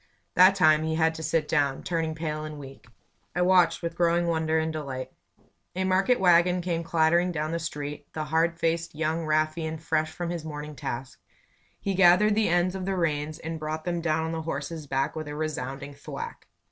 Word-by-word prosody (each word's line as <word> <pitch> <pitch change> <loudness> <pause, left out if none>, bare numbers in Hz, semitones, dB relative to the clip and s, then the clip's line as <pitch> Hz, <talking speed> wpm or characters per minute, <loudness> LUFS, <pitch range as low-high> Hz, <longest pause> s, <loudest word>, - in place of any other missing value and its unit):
That 185 +2 +7
time 155 -5 +5
he 160 0 -1
had 160 0 +2
to 160 - -7
sit 155 0 0
down, 140 -4 +1
turning 165 -2 -1
pale 155 -1 -3
and 155 -1 -7
weak. 135 -3 -11 0.5
I 180 - +2
watched 180 -2 +4
with 170 0 -2
growing 170 0 +2
wonder 160 -1 +1
and 160 0 0
delight. 135 -4 -5 0.6
A 190 - 0
market 190 +6 +2
wagon 180 0 +4
came 170 -1 -1
clattering 170 +2 +2
down 155 -1 -2
the 170 - -1
street; 145 -2 -6
the 155 - -3
hard 165 +2 +1
faced 165 -1 -1
young 160 +1 -1
ruffian 155 +1 0
fresh 155 0 0
for 175 +2 -5
his 170 -1 -3
morning 150 -1 -6
task. 125 0 -6 0.6
He 195 - -2
gathered 190 +3 +5
the 215 +1 +2
ends 175 +1 +2
of 190 -1 -4
the 195 - 0
reins 155 -2 -1
and 165 0 -5
brought 155 +1 -4
them 175 -1 -1
down 160 -1 0
on 160 - -2
the 165 -1 -3
horse's 155 0 -5
back 135 +3 -1
with 155 -1 -5
a 150 - -5
resounding 140 -2 -4
thwack. 460 - -8
160 Hz, 195 wpm, -27 LUFS, 155-170 Hz, 0.6 s, That